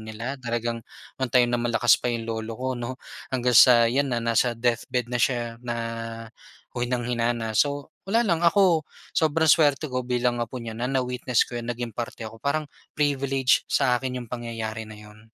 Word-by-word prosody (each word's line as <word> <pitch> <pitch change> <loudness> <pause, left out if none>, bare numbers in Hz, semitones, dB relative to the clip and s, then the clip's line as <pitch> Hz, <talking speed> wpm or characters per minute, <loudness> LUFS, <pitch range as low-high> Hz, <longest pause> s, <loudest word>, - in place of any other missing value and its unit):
nila, 115 +5 -6
talagang, 120 -1 -2 0.4
no'ng 130 - 0
time 125 -1 +5
na 120 - +1
malakas 120 0 +3
pa 125 - -1
'yong 115 -1 -2
lolo 110 0 -3
ko, 130 +1 -3
'no. 120 +2 -5 0.3
Hanggang 125 -2 0
sa 120 -2 +8
'yan 135 +4 +1
na, 120 -2 -1
nasa 115 +1 +2
deathbed 125 +1 -1
na 120 - 0
siya 120 -2 0
na 120 -1 -4 1.0
o 120 - -5
hinang-hina 120 -1 0
na. 115 -1 -3
So, 145 -1 0 0.2
wala 230 +4 +3
lang, 170 -6 +1
ako, 170 -3 +4 0.2
sobrang 160 0 +2
swerte 150 -2 +3
ko 130 - 0
bilang 125 -1 0
apo 120 +2 -4
niya 115 -2 -6
na 125 +2 -2
na-witness 125 -2 +1
ko 120 -1 -6
'yon, 115 - -8
naging 120 -1 -4
parte 120 0 -5
ako. 110 0 -9
Parang 155 +2 0 0.3
privilege 135 -3 +2
sa 125 -2 +3
akin 130 -1 -3
'yong 120 0 -11
pangyayari 115 -2 -5
na 110 - -10
'yon. 105 0 -14
120 Hz, 190 wpm, -25 LUFS, 115-130 Hz, 1.0 s, sa